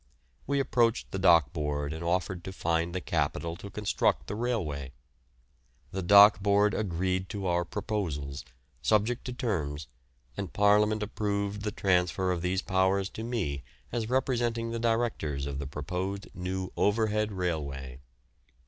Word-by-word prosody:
We 140 +1 +1
approached 120 -4 +1
the 95 - -3
Dock 85 -7 +5
Board 75 -1 -2
and 80 +1 -6
offered 90 0 -1
to 95 - -5
find 85 -1 -1
the 95 - -1
capital 85 -1 -1
to 100 +2 -9
construct 105 +1 0
the - - -5
railway. 85 - -2 1.0
The 95 - -3
Dock 100 +1 +8
Board 100 +1 +3
agreed 95 -1 -1
to 100 -3 -4
our 85 -1 +2
proposals, 85 -9 -3 0.4
subject 110 +3 +1
to 125 - -3
terms, 80 - -2 0.5
and 100 - -4
Parliament 105 +1 +4
approved 100 -1 -2
of 105 - -8
the 105 - 0
transfer 90 -1 +1
of 90 -2 -1
these 90 +1 0
powers 95 +1 +2
to 110 - -6
me 110 - -2 0.3
as 115 -2 -2
representing 120 -3 0
the 115 - -3
directors 115 - 0
of 70 -1 -4
the 70 - -4
proposed 95 +8 -4
new 95 0 -4
Overhead 105 0 +1
Railway. 70 -9 -3
95 Hz, 150 wpm, -29 LUFS, 85-105 Hz, 1.0 s, Dock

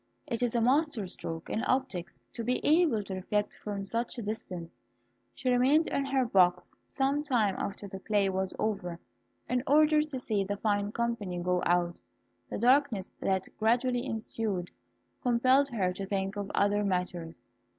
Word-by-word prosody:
It 235 - -3
is 245 -1 0
a 235 - +3
master 265 -2 +2
stroke 165 -2 -6
in 220 - -2
optics 230 -9 -1
to 230 - -4
be 250 +2 0
able 305 -9 +4
to 195 - -6
reflect 205 +2 -2
from 200 -2 -4
such 230 +5 -2
a 235 - -4
distance. 185 -5 -5 0.6
She 255 -2 0
remained 265 +6 +4
in 280 - 0
her 270 -2 +1
box 180 -5 +3
some 275 +1 0
time 240 -9 +1
after 200 +1 -4
the 195 0 -7
play 205 -1 +1
was 190 0 -1
over, 185 -6 -2 0.5
in 250 0 +1
order 305 +1 +5
to 300 -4 -4
see 215 -5 0
the 200 +1 -3
fine 205 -1 0
company 230 -6 -2
go 180 0 0
out. 175 0 +1 0.5
The - - -3
darkness 245 -4 +3
that 190 -1 0
gradually 245 +2 +2
ensued 220 -6 -3 0.5
compelled 255 +3 +4
her 190 -7 0
to 195 +1 -5
think 195 0 -2
of 200 -1 -4
other 205 +1 +2
matters. 180 -7 -3
210 Hz, 165 wpm, -30 LUFS, 190-250 Hz, 0.6 s, order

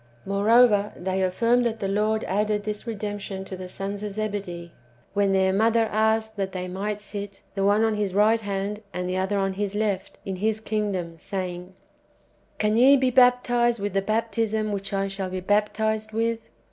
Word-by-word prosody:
^ - - -31 0.2
Moreover, 210 +1 +4
they 190 +1 -2
affirm 230 +7 +2
that 230 -2 -1
the 200 - -2
Lord 215 +2 +1
added 210 +2 0
this 210 +2 -4
redemption 205 -3 -4
to 190 - -7
the 185 0 -8
sons 200 +2 -5
of 210 -1 -4
Zebedee, 195 -5 -4 0.4
when 200 -1 +2
their 190 0 +3
mother 225 +3 +3
asked 220 0 +1
that 195 -1 -2
they 185 -1 -4
might 200 +3 -3
sit, 205 -1 -7
the 195 - -1
one 205 +2 +4
on 225 -1 +2
His 205 -3 -2
right 220 +2 +4
hand, 200 +1 -3
and 180 0 -2
the 185 +1 -1
other 190 +2 0
on 195 -1 0
His 205 +1 -3
left, 205 -3 -2
in 190 -1 -4
His 215 +3 0
kingdom, 200 -6 -3
saying, 180 0 -5 0.4
" - - -37
Can 215 +1 +1
ye 270 +4 +7
be 260 -1 +2
baptized 245 -2 +4
with 200 -1 -3
the 195 - +2
baptism 220 0 0
which 200 -1 -3
I 195 0 0
shall 195 -1 -4
be 185 0 -3
baptized 215 +2 0
with?"" 230 +1 0
205 Hz, 190 wpm, -25 LUFS, 195-220 Hz, 0.4 s, ye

